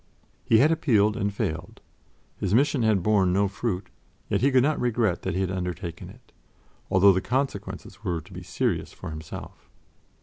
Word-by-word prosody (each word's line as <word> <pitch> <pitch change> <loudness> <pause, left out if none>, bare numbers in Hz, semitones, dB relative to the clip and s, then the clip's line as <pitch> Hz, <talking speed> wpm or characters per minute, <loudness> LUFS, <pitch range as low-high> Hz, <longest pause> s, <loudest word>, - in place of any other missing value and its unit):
He 110 - +4
had 145 +8 +5
appealed 110 -10 +3
and 100 0 -1
failed 85 -3 -4 0.6
his 100 +1 +1
mission 140 +1 +3
had 110 -5 +2
borne 100 -3 +3
no 100 +2 +2
fruit, 100 -1 -3 0.4
yet - - +1
he 135 - +4
could 130 -2 +4
not 150 +1 +1
regret 115 -6 +1
that 95 -2 -3
he 95 - 0
had 95 -1 -1
undertaken 90 -2 -5
it, - - -17 0.6
although 95 +1 +6
the 95 - 0
consequences 130 +5 -3
were 85 -2 -1
to 75 - -15
be - - -7
serious - - -2
for - - -8
himself. 80 0 -9
100 Hz, 175 wpm, -26 LUFS, 90-120 Hz, 0.6 s, although